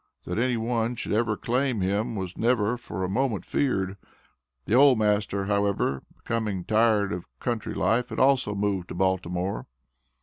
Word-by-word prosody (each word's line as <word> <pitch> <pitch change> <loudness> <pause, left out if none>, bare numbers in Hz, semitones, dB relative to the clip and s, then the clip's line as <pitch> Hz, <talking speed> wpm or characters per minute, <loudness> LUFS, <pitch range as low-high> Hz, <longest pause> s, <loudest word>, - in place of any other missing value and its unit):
That 90 +5 -2
any 125 0 +1
one 115 +1 -1
should - - -5
ever 110 0 +1
claim 125 -2 0
him 100 +4 0
was 95 -3 -4
never 115 -1 +1
for 105 -6 -6
a - - 0
moment 115 +1 -1
feared. 95 -8 0 0.7
The - - -2
old 135 0 +7
master, 105 -2 +1
however, 100 -9 0 0.2
becoming 110 -6 -2
tired 110 -2 +3
of 90 - -6
country 120 -3 -3
life, 115 +6 +1
had - - -6
also 130 -6 +3
moved 100 -3 -1
to - - -7
Baltimore. 90 -5 -1
105 Hz, 160 wpm, -26 LUFS, 95-120 Hz, 0.7 s, old